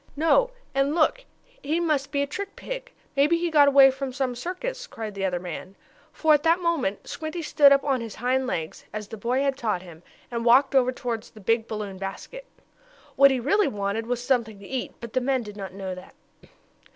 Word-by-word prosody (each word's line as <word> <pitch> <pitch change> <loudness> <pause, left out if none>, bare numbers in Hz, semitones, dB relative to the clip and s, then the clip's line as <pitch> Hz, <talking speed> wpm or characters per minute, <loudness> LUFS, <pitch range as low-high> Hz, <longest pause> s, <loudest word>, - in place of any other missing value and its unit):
"No, 330 +12 +3 0.2
and 275 +3 +1
look! 425 +10 +2 0.4
He 310 +4 0
must 300 -5 0
be 280 -1 +1
a - - 0
trick 400 +8 -6
pig! - - -7 0.2
Maybe 295 +5 +4
he 340 0 -1
got 295 -2 +6
away 275 -1 +7
from 270 0 -5
some 260 -1 -2
circus!" 480 - -5
cried 220 -2 -6
the 195 -1 -5
other 180 -2 -1
man. 180 +2 -7 0.4
For, 315 -1 +3
at 295 - +4
that 330 +2 +4
moment 330 - -1
Squinty 320 +2 -5
stood 290 -2 +5
up 275 0 +5
on 270 -3 0
his 225 -3 -7
hind 255 +2 0
legs, 165 -10 -4
as 210 -1 -6
the 225 - -6
boy 245 +5 0
had 275 -1 +1
taught 210 -6 -1
him, 170 -3 -13 0.3
and 235 -1 -2
walked 260 +4 +5
over 255 -2 +4
toward 245 -3 -3
the 215 - -16
big 225 +3 +1
balloon 205 -3 -5
basket. - - -7 0.7
What 275 0 +7
he 265 -2 0
really 345 - +2
wanted 205 +2 -2
was 245 0 -2
something 235 -5 0
to 200 0 -12
eat, 260 -2 -4
but 235 -1 -9
the 255 - +1
men 260 -1 0
did 210 -2 -9
not 195 -3 -6
know 190 -1 -5
that. 185 0 -12
260 Hz, 210 wpm, -25 LUFS, 215-300 Hz, 0.7 s, away